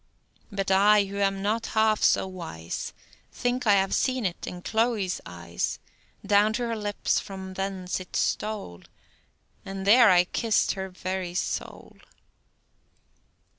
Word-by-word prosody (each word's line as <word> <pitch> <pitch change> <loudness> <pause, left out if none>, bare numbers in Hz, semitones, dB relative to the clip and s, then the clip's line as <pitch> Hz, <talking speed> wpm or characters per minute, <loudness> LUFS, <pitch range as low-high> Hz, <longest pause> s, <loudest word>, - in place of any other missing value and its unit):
But 195 -1 -2
I, 205 +2 +6
who 200 +1 -7
am 195 -1 0
not 220 +2 0
half 220 -1 +3
so - - +4
wise, 165 - -6 0.4
Think 245 0 -2
I 205 - +7
have 195 -1 +2
seen't 250 -9 -1
in 180 0 -7
Chloe's 220 -5 0
eyes; 85 -1 -4 0.5
Down 205 +2 +4
to 240 +2 -1
her 230 -1 -2
lips 205 -1 -1
from 190 -1 -8
thence 190 -1 -3
it 185 - -10
stole, 205 - -2 0.8
And 195 -1 -6
there 230 +2 +7
I 180 -1 +6
kiss'd 220 +4 +1
her 190 -1 -4
very 185 -1 -4
soul. - - -4
195 Hz, 135 wpm, -26 LUFS, 185-215 Hz, 0.8 s, I